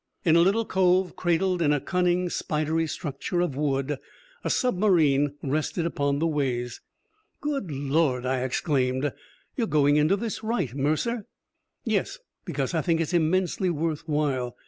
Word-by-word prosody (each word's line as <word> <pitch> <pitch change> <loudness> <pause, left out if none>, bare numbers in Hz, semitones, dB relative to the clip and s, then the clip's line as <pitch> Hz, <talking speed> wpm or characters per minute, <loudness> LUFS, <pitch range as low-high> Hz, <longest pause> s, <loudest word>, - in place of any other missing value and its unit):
In 165 -2 +5
a - - +6
little 200 +6 +3
cove, 185 -2 +2
cradled 180 +1 +1
in 150 -3 +3
a 145 - +2
cunning, 180 +2 +1
spidery 160 -1 -1
structure 150 +3 -3
of 175 -6 0
wood, 140 -1 -1 0.4
a - - -1
submarine 165 - +2
rested 155 +4 -1
upon 140 -4 0
the 160 - 0
ways. 130 -6 -1 0.6
"Good 280 - -2
Lord!" 140 -2 0
I 130 0 0
exclaimed. 130 0 0 0.4
"You're 235 -4 0
going 145 -3 +3
into 155 +6 +4
this 220 +1 -4
right, 220 - -1
Mercer!" 155 - -1 0.6
"Yes. - - 0 0.3
Because - - -2
I - - +1
think 165 -2 +1
it's 165 +2 -1
immensely 180 +2 +1
worth 165 0 -2
while. 135 -5 -1
155 Hz, 145 wpm, -26 LUFS, 140-180 Hz, 0.6 s, a